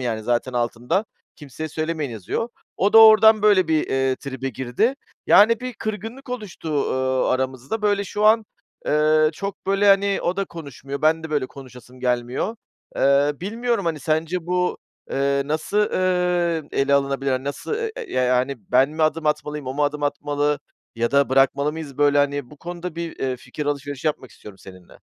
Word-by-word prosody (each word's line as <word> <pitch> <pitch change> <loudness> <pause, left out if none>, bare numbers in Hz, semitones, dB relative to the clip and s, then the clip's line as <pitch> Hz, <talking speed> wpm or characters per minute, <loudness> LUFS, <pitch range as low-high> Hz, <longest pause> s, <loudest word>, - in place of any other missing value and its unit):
yani, 115 -3 -2
zaten 120 +3 -1
altında 120 - -1 0.3
kimseye 150 +2 -7
söylemeyin 155 -2 -3
yazıyor." 110 - -3 0.3
O 200 +3 +1
da 225 - +9
oradan 220 -1 +8
böyle 195 -5 +4
bir, 155 -1 +1
eee, 135 -1 0
tribe 135 -1 -5
girdi, 130 - -1 0.3
yani 225 +2 +6
bir 255 0 -5
kırgınlık 225 +5 -6
oluştu, 210 -9 -6 0.2
ııı, 130 0 0
aramızda. 130 - -2
Böyle 205 -1 +1
şu 210 +2 -2
an, 220 +1 +5 0.4
eee, 155 +1 +3
çok 195 +4 -6
böyle, 195 +1 +2
hani, 195 0 +4
o 175 - -1
da 195 - 0
konuşmuyor. 140 -4 -8
Ben 160 +1 +3
de 160 - -7
böyle 145 -4 0
konuşasım 125 -2 -13
gelmiyor. 125 - -1 0.4
Eee, 140 +1 +3
bilmiyorum, 230 +1 -1
hani, 160 -3 -2
sence 160 +3 -1
bu, 180 0 0 0.3
eee, 140 0 +1
nasıl, 155 +7 -2
ııı, 180 -5 +1
ele 140 +1 +2
alınabilir, 140 0 0
hani, 130 +1 -2
nasıl 140 - -4
e 450 0 -3
e - - -7
ya 130 - +1
yani, 125 +2 +1 0.2
ben 130 +3 +5
mi 155 +1 -2
adım 155 0 +1
atmalıyım, 150 -1 -2
o 130 - -4
mu 145 +1 +1
adım 145 +1 -2
atmalı 145 0 0 0.4
ya 115 0 0
da 140 0 +3
bırakmalı 135 +2 +2
mıyız 150 -4 -8
böyle 145 0 +4
hani? 145 -2 0
Bu 150 - -13
konuda 175 +1 -7
bir, 170 -1 -5
eee, 130 -1 -2
fikir 150 +4 -7
alışverişi 145 0 -3
yapmak 140 -5 -2
istiyorum 100 -2 -13
seninle. 90 -2 -15
150 Hz, 175 wpm, -22 LUFS, 135-185 Hz, 0.4 s, da